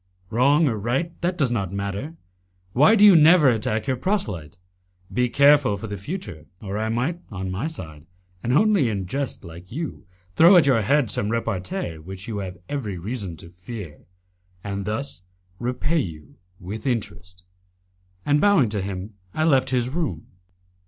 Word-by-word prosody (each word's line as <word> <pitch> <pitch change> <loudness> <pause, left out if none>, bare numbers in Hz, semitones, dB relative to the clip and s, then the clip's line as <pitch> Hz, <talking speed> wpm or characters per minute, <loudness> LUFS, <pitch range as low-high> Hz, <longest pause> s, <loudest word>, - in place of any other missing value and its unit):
"Wrong 140 +7 +4
or 115 -5 -1
right, 135 - -1
that 175 +1 -1
does 140 -6 +1
not 100 -6 -1
matter. 100 +10 -4 0.6
Why 150 - +6
do 210 -1 +6
you 200 -3 +9
never 160 -2 +7
attack 110 -2 0
your 130 - -1
proselyte? 105 - -2 0.6
Be 125 0 +1
careful 140 -4 +5
for 100 - -7
the 105 -1 -5
future, 100 - -7
or 100 -2 -6
I 110 0 -1
might 130 +10 -1
on 95 -2 -5
my 100 +11 -2
side, 80 - -9 0.3
and 120 - -2
only 195 - +4
in 100 -3 -3
jest 135 +8 -3
like 85 +1 -11
you, 155 - -6 0.3
throw 175 +3 +8
at 165 - +6
your 130 -5 +3
head 135 +2 +2
some 100 - -1
repartee 115 - -3
which 95 +4 -9
you 110 -3 -3
have 95 -2 -6
every 115 -10 -4
reason 95 -2 -5
to 85 - -11
fear, 90 -3 -9 0.6
and 100 -1 -4
thus 110 0 -4 0.4
repay 125 +7 0
you 80 - -7 0.2
with 105 +7 -6
interest." 90 -7 -4 0.8
And 145 0 +3
bowing 200 - +4
to 105 -2 -2
him 95 +2 -5 0.2
I 155 - +1
left 135 -4 +3
his 125 -2 +1
room. 145 - -3
115 Hz, 165 wpm, -23 LUFS, 95-145 Hz, 0.8 s, you